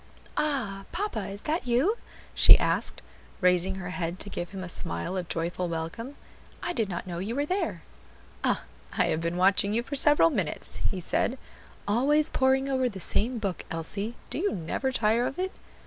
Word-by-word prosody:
"Ah! 235 -10 -1
papa, 405 - -2
is 200 +1 -6
that 310 -3 -1
you?" 265 - +3 0.4
she - - +9
asked, - - -1 0.4
raising 180 0 +3
her 180 -1 -5
head 170 -1 -3
to 200 - -4
give 175 -2 -4
him 190 -1 -6
a - - -5
smile 85 - -3
of 180 -2 -3
joyful 170 +2 -1
welcome. 170 - -4 0.5
"I 350 - -1
did 225 - 0
not 175 0 -4
know 175 -2 -5
you 210 +6 -3
were 285 +1 +1
there." 335 - -2 0.6
"Ah! - - +1 0.3
I - - +4
have 155 - 0
been 170 +1 -1
watching 195 +2 +4
you 235 +2 +1
for 280 - -8
several 295 +3 +6
minutes," 190 - -3
he 190 -3 -3
said; 245 +8 0 0.5
"always 290 +8 +3
poring 265 +1 +3
over 260 -2 +1
the 195 -4 -8
same 235 +7 +2
book, 200 -5 -3
Elsie; 200 +8 -3 0.2
do - - -2
you 405 +4 +1
never 185 +10 -2
tire 230 0 +2
of 270 - -6
it?" 375 +1 -1
205 Hz, 185 wpm, -28 LUFS, 180-265 Hz, 0.6 s, she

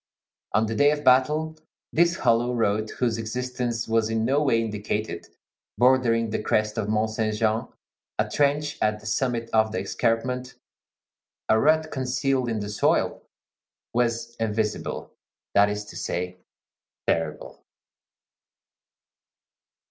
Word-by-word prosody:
On 110 +2 +3
the 110 - -3
day 145 +5 +4
of 150 0 -1
battle, 150 +5 +3 0.4
this 170 +1 +4
hollow 120 -3 +2
road 110 -1 +1
whose 120 -3 0
existence 120 0 -3
was 110 -1 +1
in 115 0 0
no 140 +4 +2
way 130 -6 +3
indicated, 105 -4 -3 0.5
bordering 120 -3 +3
the - - -1
crest 105 0 +1
of 105 -2 -2
Mont 110 0 +1
Saint 110 -1 -1
Jean, 110 0 +1 0.5
a - - +1
trench 145 +1 0
at 105 0 +1
the 110 - -17
summit 115 +1 -1
of 110 0 +3
the - - -2
escarpment, 125 +2 -1 0.9
a 110 - +5
rut 155 +3 +3
concealed 130 -1 0
in 110 -2 -1
the 105 - -4
soil, 105 - +1 0.7
was 115 0 0
invisible; 110 -1 -2 0.4
that 100 0 +5
is 105 0 -3
to - - -12
say, 90 +1 -3 0.7
terrible. 75 -2 -2
115 Hz, 130 wpm, -25 LUFS, 110-125 Hz, 0.9 s, a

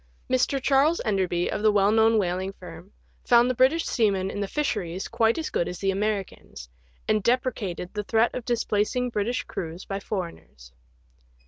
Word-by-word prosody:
Mr. 255 +2 +2
Charles 280 +5 +3
Enderby, 185 -4 0
of - - -3
the 215 0 +4
well 205 0 +3
known 225 0 +4
whaling 190 -1 -1
firm, 180 0 -12 0.3
found 240 0 +5
the 255 - +1
British 265 +7 +3
seamen 195 -5 +1
in - - -5
the 200 - -2
fisheries 195 - -2
quite 225 0 +1
as 320 - -3
good 170 - 0
as 180 - -5
the 195 +1 0
Americans, 195 - -4 0.4
and 215 0 +2
deprecated 210 -6 -1
the 210 -1 -3
threat 225 +3 +2
of 250 - -4
dis 235 -1 -1
placing 240 +4 0
British 230 +3 -1
crews 165 +1 -6
by 195 0 -4
foreigners. 170 - -7
210 Hz, 175 wpm, -25 LUFS, 190-240 Hz, 0.4 s, found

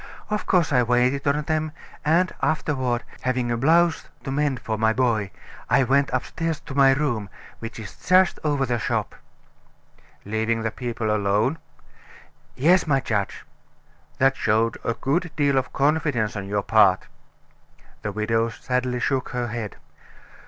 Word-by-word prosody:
Of 210 - -2
course, 170 -5 +2
I 125 - +5
waited 125 +4 +1
on 145 +2 +1
them, 155 0 -1 0.3
and 170 +4 +2
afterward, 130 -6 0 0.2
having 125 -1 -1
a - - +1
blouse 165 +6 +3
to 135 - -4
mend 140 -2 0
for 110 - -3
my 110 +1 +2
boy, 110 -5 +1 0.4
I - - +4
went 140 +2 +2
upstairs 160 +5 -2
to - - -9
my 135 -1 +5
room, 125 -8 -1 0.3
which 115 0 -7
is 105 -3 -9
just 185 0 +3
over 145 -3 +1
the 120 -2 -1
shop." - - -2 1.1
"Leaving 110 +2 -1
the 110 - -1
people 115 -3 -2
alone?" 105 +9 +1 1.0
"Yes, 170 +7 +3
my 140 -3 +3
judge." 105 -5 -2 0.7
"That 135 0 +3
showed 115 0 +1
a 115 - -1
great 170 +5 -1
deal 145 -2 +2
of 130 -1 0
confidence 140 -7 +1
on 100 -2 -5
your 100 0 -1
part." - - +4 1.0
The 105 - -3
widow 115 +2 0
sadly 125 +1 -2
shook 130 -1 0
her 120 -1 -3
head. 110 -2 -5
130 Hz, 150 wpm, -24 LUFS, 115-145 Hz, 1.1 s, I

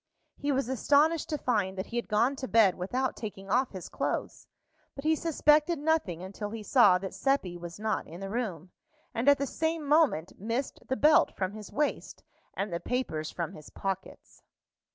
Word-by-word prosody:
He 290 0 -2
was 270 -3 0
astonished 290 +5 +2
to 305 - -1
find 205 -8 0
that 190 - -3
he 235 - -9
had 240 - -1
gone 230 +6 +2
to 260 - -4
bed 220 -6 +5
without 245 +9 -2
taking 195 -3 -7
off 255 +3 +3
his 185 -3 -8
clothes, - - -3 0.5
but 275 - -7
he 315 +1 +3
suspected 310 0 +3
nothing 285 - 0
until 200 +2 -6
he 220 0 -6
saw 205 -6 +6
that 190 +1 -6
Seppi 270 -11 0
was 175 +1 -8
not 215 0 -1
in 170 +2 -9
the 195 0 -6
room, 190 -7 -3 0.4
and 240 +5 +2
at 285 - +6
the 280 - -1
same 320 +2 -2
moment 285 - +3
missed 230 +7 -3
the 260 - -1
belt 305 0 +4
from 185 -1 -1
his 210 0 -9
waist 295 0 -2 0.3
and 195 -2 -3
the 170 - -1
papers 165 -12 -2
from 170 -3 -4
his 155 - -12
pockets. 195 -1 -6
230 Hz, 190 wpm, -29 LUFS, 190-280 Hz, 0.5 s, saw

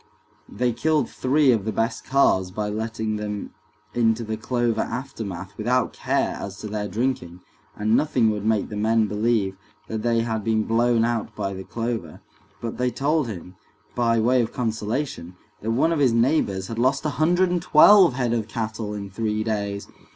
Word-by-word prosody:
They 125 -1 0
killed 150 +5 +1
three 135 +1 +3
of 110 -5 +1
the 110 - -2
best 115 +3 -1
calves 110 -9 +3
by 105 +3 -3
letting 110 0 -3
them 105 -1 -5 0.4
into 115 -1 +2
the 110 0 -3
clover 120 0 0
aftermath 100 -6 -5
without 125 +3 +1
care - - -1
as 100 -1 -6
to - - -5
their 105 0 -3
drinking, 100 -5 -2 0.3
and 110 +2 +1
nothing 125 -7 +2
would 105 -1 -4
make 110 -1 +1
the 105 - -6
men 110 +1 +2
believe 105 -2 0 0.3
that 110 -1 -3
they 115 0 +2
had 110 -2 -2
been 110 0 +1
blown 115 +1 +2
out 115 -2 -2
by 100 -2 -3
the 95 0 -7
clover, 115 -7 -4 0.4
but 115 0 -5
they 125 0 +2
told 145 +3 0
him, 90 -3 -8 0.4
by 115 -1 +2
way 125 +3 +3
of 115 - -2
consolation, 115 - -3 0.3
that 110 - -3
one 130 +8 +2
of 165 - 0
his 130 -5 +4
neighbors 115 -6 +1
had 115 +3 -5
lost 135 +4 +1
a - - +2
hundred 175 +3 +3
and 175 -1 0
twelve 180 0 +7
head 125 -3 0
of 110 -3 -1
cattle 110 -1 -4
in 100 -1 -5
three 105 +2 -2
days. 100 -2 -3
115 Hz, 180 wpm, -24 LUFS, 105-125 Hz, 0.4 s, twelve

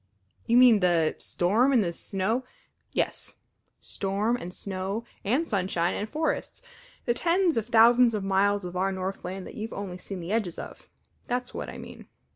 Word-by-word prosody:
"You 235 - +4
mean 245 -4 +7
the 170 -4 +2
storm, 220 +10 +2
and 245 -5 +4
the 170 -2 -2
snow 205 +8 -1 0.3
" - - -35
"Yes; - - -5 0.5
storm, 200 +4 -1
and 180 -7 -6
snow, 195 +3 -4 0.2
and 260 +11 +1
sunshine, 180 -4 0
and 210 - -3
forests 315 +9 -2 0.4
the 240 - +2
tens 345 +5 +2
of 225 -1 -1
thousands 235 0 +6
of 205 - -2
miles 200 0 +2
of 175 0 -6
our 190 +2 +1
Northland 190 0 -4
that - - -9
you've 220 +1 -5
seen - - -8
only 195 -3 -5
the 185 -1 -6
edges 210 -6 -1
of. - - -9 0.4
That's 250 0 -2
what - - -5
I - - -8
mean. - - -11
205 Hz, 175 wpm, -27 LUFS, 185-240 Hz, 0.5 s, mean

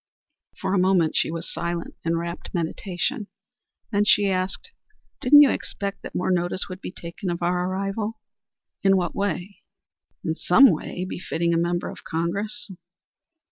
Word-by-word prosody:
For 190 - -1
a 195 - +3
moment 180 -3 +3
she - - +2
was 165 +1 -5
silent 170 0 -3
in 165 0 +1
wrapt 170 +3 -5
meditation, 190 - -2 0.6
then 205 -1 +3
she 210 -1 +4
asked: 185 - -2 0.5
"Didn't 290 +3 +8
you 275 - +5
expect 200 0 -4
that - - -9
more 180 - 0
notice 175 +1 0
would 185 +1 -8
be - - -5
taken 175 +1 -6
of 175 0 -2
our 180 +1 +1
arrival?" 200 +3 -2 0.6
"In 195 -1 +5
what 175 -2 -1
way?" 200 -1 -2 0.7
"In 160 - +1
some 205 +10 +6
way 180 +3 -3
befitting 170 -2 -1
a - - +2
member 175 +1 0
of - - -9
Congress." 200 +7 -2
185 Hz, 155 wpm, -24 LUFS, 170-200 Hz, 0.7 s, Didn't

